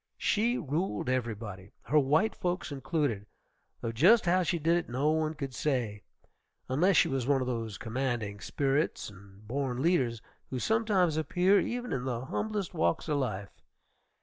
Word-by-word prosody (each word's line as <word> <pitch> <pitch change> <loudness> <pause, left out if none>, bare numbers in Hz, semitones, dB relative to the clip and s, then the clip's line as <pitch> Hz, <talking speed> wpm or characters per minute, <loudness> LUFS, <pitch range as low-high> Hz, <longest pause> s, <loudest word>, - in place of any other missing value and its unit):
She 235 +4 +1
ruled 145 - -2
everybody, 110 -6 -3
her 150 +4 +3
white 155 +10 +2
folks 180 -2 -3
included, 135 - -1 0.5
though 115 - -2
just 180 - +5
how 180 +2 +3
she 175 0 0
did 165 +2 +2
it 175 -6 -1
no 135 +5 +1
one 155 0 0
could 135 -3 -5
say, 125 -7 -1 0.7
unless 170 +7 +3
she - - +5
was 135 -2 -2
one 140 -1 +3
of 130 - -1
those 115 -4 -3
commanding 115 -4 -2
spirits 135 - -1
and 100 +2 -16
born 130 0 -2
leaders 130 -7 +2 0.3
who 130 - -3
sometimes 195 - +2
appear 180 +6 +3
even 245 0 -3
in 125 -1 -2
the 125 -1 -3
humblest 210 +4 -3
walks 85 - 0
of 150 -2 +1
life. 100 -7 -3
135 Hz, 160 wpm, -30 LUFS, 115-170 Hz, 0.7 s, just